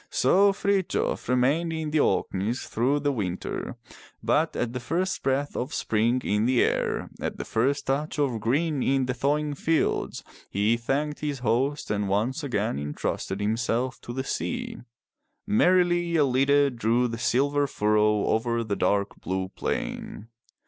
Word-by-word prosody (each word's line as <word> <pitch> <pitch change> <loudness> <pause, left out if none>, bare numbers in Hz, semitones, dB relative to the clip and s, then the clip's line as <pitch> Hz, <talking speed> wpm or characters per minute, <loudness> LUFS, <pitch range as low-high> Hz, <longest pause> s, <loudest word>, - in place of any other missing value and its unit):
'' - - -40
So 200 +1 +5
Frithjof 195 -7 -1
remained 140 +7 +2
in 160 -2 -3
the 155 - +2
Orkneys 110 -1 0
through 135 +6 0
the 145 0 +1
winter, 95 -8 -4 0.5
but - - +1
at 120 0 -2
the 125 - -3
first 175 +10 -1
breath 135 +2 -1
of 130 +5 -3
spring 115 +4 +1
in 105 +3 +1
the 125 -1 +4
air, - - -1
at - - -3
the - - -5
first 135 +6 0
touch 145 +4 -1
of 135 -6 0
green 140 +6 0
in 135 0 +2
the 130 - -1
thawing 145 +4 0
fields, 160 +3 0 0.3
he 105 +4 +2
thanked 140 +6 -2
his 145 -2 -2
host 135 +6 0
and 105 -1 -1
once 115 +10 0
again 110 - -1
entrusted 75 +6 -3
himself 115 +4 -1
to - - -7
the 130 +2 -3
sea. 240 - -3 0.7
Merrily 175 - +3
EUide 140 -2 +3
drew 120 +2 +2
the 115 -1 -5
silver 140 +4 +2
furrow 105 -2 +2
over 115 +1 0
the 105 -3 -2
dark 100 +2 0
blue 95 0 -2
plain. 105 +3 -4
130 Hz, 155 wpm, -26 LUFS, 110-145 Hz, 0.7 s, So